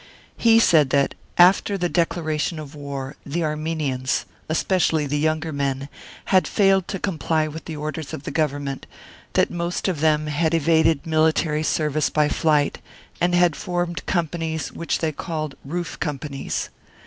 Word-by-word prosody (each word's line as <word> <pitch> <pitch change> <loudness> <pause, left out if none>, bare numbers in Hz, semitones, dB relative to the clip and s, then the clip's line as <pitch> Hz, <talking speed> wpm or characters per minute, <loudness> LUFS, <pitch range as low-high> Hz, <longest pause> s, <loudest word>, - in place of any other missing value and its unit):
He 225 -1 +5
said 160 -10 +5
that, 140 0 +2 0.2
after 190 +3 +5
the 175 -1 0
declaration 165 -2 -1
of 150 -2 -8
war, 140 -1 -6
the 165 +4 -2
Armenians, 150 -4 -1 0.2
especially 160 -1 +1
the 145 +1 -1
younger 155 +1 0
men, 140 -1 -2 0.4
had 185 - +5
failed 195 -2 +3
to 195 - -3
comply 160 -4 0
with 155 +1 -8
the 160 - -5
orders 155 0 -5
of 135 - -6
the - - -5
Government, 145 -3 -2 0.5
that - - +2
most 175 +2 -2
of 180 -6 -1
them 155 0 +2
had 155 +2 +1
evaded 160 -1 +3
military 155 -1 +2
service 155 -1 +1
by 150 -1 +2
flight, 150 -3 +1 0.4
and 175 0 +3
had 175 -3 +4
formed 175 -2 -3
companies 165 -3 -1
which 170 - -2
they 160 -1 -1
called 155 -1 -4
" - - -33
Roof 175 +5 -4
Companies." 145 -3 -3
155 Hz, 155 wpm, -23 LUFS, 150-170 Hz, 0.5 s, He